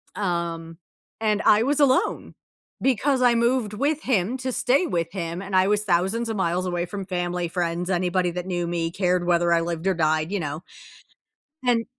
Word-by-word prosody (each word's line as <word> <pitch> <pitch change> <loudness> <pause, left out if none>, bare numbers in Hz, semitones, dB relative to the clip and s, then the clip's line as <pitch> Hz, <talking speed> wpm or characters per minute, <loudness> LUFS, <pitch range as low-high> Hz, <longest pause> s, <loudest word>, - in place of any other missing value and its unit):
um, 170 -4 -3 0.4
and 215 -2 +1
I 210 +2 +5
was 285 +3 +1
alone 265 -2 +2 0.5
because 265 +1 +1
I 245 -1 +4
moved 235 -2 +1
with 290 +7 -1
him 235 0 0
to 260 0 -3
stay 265 +9 +2
with 170 - -2
him, 170 -1 -4
and 195 -1 -4
I 185 +1 +4
was 210 0 +1
thousands 195 +5 0
of 220 - -2
miles 180 0 0
away 175 -1 -1
from 195 +1 -6
family, 175 -1 -2
friends, 175 +1 -2
anybody 180 0 +1
that 180 +1 -5
knew 175 -2 -2
me, 165 -1 -2
cared 180 -1 0
whether 175 -1 +2
I 165 - +3
lived 170 +2 -3
or 190 - +3
died, 155 +1 0
you 200 - -1
know 150 +1 -4 1.0
and 235 -2 +2
185 Hz, 185 wpm, -24 LUFS, 170-225 Hz, 1.0 s, I